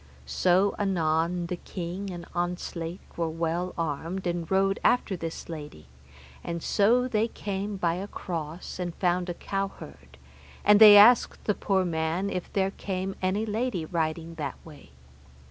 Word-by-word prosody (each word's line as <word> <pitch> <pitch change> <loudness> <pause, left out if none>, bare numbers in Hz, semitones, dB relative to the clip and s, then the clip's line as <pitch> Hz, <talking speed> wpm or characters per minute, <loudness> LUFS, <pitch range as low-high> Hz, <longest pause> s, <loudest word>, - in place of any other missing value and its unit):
So 185 - +2
anon 170 -2 +1
the 175 +1 -4
king 180 +3 -6
and 175 -2 -7
Ontzlake 175 0 -4
were 165 -1 0
well 165 +2 -2
armed, 165 +4 -3
and 170 -2 -2
rode 195 0 +2
after 245 -5 +2
this 165 -2 -6
lady, 150 - -8 0.6
and 170 -1 -4
so 240 +5 +3
they 225 -2 +1
came 200 -2 -4
by 170 -3 +1
a 190 +3 -4
cross 165 -2 -6
and 175 -2 -3
found 180 0 0
a 175 - -3
cowherd, 155 - -6 0.5
and 210 0 +7
they 210 -2 +11
asked 230 +4 +6
the 210 - +1
poor 190 -2 0
man 165 +3 -1
if 180 -1 -4
there 195 -1 +1
came 190 -1 -4
any 190 +4 0
lady 220 -5 -2
riding 165 0 -2
that 140 -3 -3
way. 150 -3 -14
180 Hz, 150 wpm, -27 LUFS, 165-195 Hz, 0.6 s, they